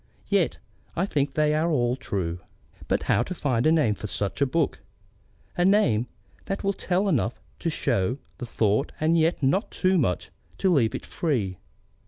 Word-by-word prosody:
Yet -, -, +2 dB, 0.4 s
I 175 Hz, -, +1 dB
think 145 Hz, -7 st, -1 dB
they 150 Hz, -1 st, +3 dB
are 155 Hz, +2 st, +1 dB
all 125 Hz, -5 st, +1 dB
true. 95 Hz, -10 st, -3 dB, 0.5 s
But -, -, 0 dB
how -, -, +2 dB
to 185 Hz, -, -3 dB
find 130 Hz, -5 st, +1 dB
a -, -, +5 dB
name 150 Hz, -10 st, +3 dB
for 105 Hz, -, -6 dB
such 100 Hz, +5 st, -2 dB
a 140 Hz, -, +4 dB
book, 160 Hz, +2 st, 0 dB, 0.8 s
a 175 Hz, -, +1 dB
name 175 Hz, -, +3 dB, 0.4 s
that 195 Hz, +1 st, -3 dB
will 200 Hz, 0 st, +1 dB
tell 185 Hz, +1 st, 0 dB
enough 195 Hz, -, 0 dB, 0.2 s
to 170 Hz, -, -1 dB
show 115 Hz, -, 0 dB, 0.2 s
the 125 Hz, -, -5 dB
thought 110 Hz, +3 st, +1 dB
and 160 Hz, +2 st, +3 dB
yet 165 Hz, -2 st, +2 dB
not 185 Hz, -, +2 dB
too 185 Hz, -1 st, +2 dB
much 90 Hz, -, -1 dB, 0.3 s
to 190 Hz, -2 st, +2 dB
leave 120 Hz, -8 st, +2 dB
it -, -, -6 dB
free? 110 Hz, -, -1 dB
145 Hz, 180 wpm, -26 LUFS, 115-170 Hz, 0.8 s, a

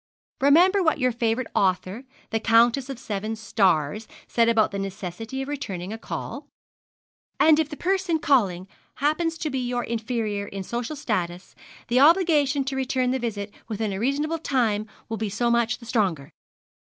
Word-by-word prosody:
'Remember 350 Hz, +8 st, +5 dB
what 320 Hz, -3 st, +2 dB
your 255 Hz, -2 st, +2 dB
favourite 235 Hz, +1 st, -1 dB
author, 190 Hz, +5 st, 0 dB, 0.3 s
the 225 Hz, -, +1 dB
Countess 235 Hz, +4 st, +3 dB
of 270 Hz, -, -5 dB
Seven 215 Hz, -2 st, -4 dB
Stars, 195 Hz, -3 st, +1 dB, 0.2 s
says 230 Hz, -1 st, +3 dB
about 225 Hz, -2 st, +3 dB
the 200 Hz, -, -4 dB
necessity 195 Hz, +7 st, -5 dB
of -, -, -8 dB
returning 205 Hz, -10 st, -5 dB
a -, -, -5 dB
call -, -, -6 dB, 0.9 s
"and 315 Hz, -1 st, +6 dB
if 310 Hz, -2 st, 0 dB
the 295 Hz, -, -7 dB
person 375 Hz, -2 st, 0 dB
calling 205 Hz, -, +1 dB, 0.3 s
happen 310 Hz, +4 st, +1 dB
to 325 Hz, -1 st, -4 dB
be 265 Hz, -, -1 dB
your 245 Hz, -1 st, -2 dB
inferior 220 Hz, -3 st, -2 dB
in 195 Hz, -1 st, -6 dB
social 240 Hz, +8 st, -4 dB
status, 185 Hz, -9 st, -3 dB, 0.3 s
the 245 Hz, +2 st, +2 dB
obligation 295 Hz, -3 st, +4 dB
to 265 Hz, 0 st, -3 dB
return 260 Hz, -1 st, 0 dB
the 260 Hz, -, 0 dB
visit 210 Hz, -4 st, -4 dB
within 215 Hz, -2 st, -2 dB
a 190 Hz, -, -4 dB
reasonable 295 Hz, +7 st, 0 dB
time 225 Hz, -8 st, 0 dB, 0.2 s
will 225 Hz, -, -4 dB
be 215 Hz, 0 st, -2 dB
so 235 Hz, +4 st, 0 dB
much 235 Hz, 0 st, +2 dB
the 235 Hz, -, -14 dB
stronger." 195 Hz, -, -1 dB
235 Hz, 165 wpm, -25 LUFS, 210-275 Hz, 0.9 s, and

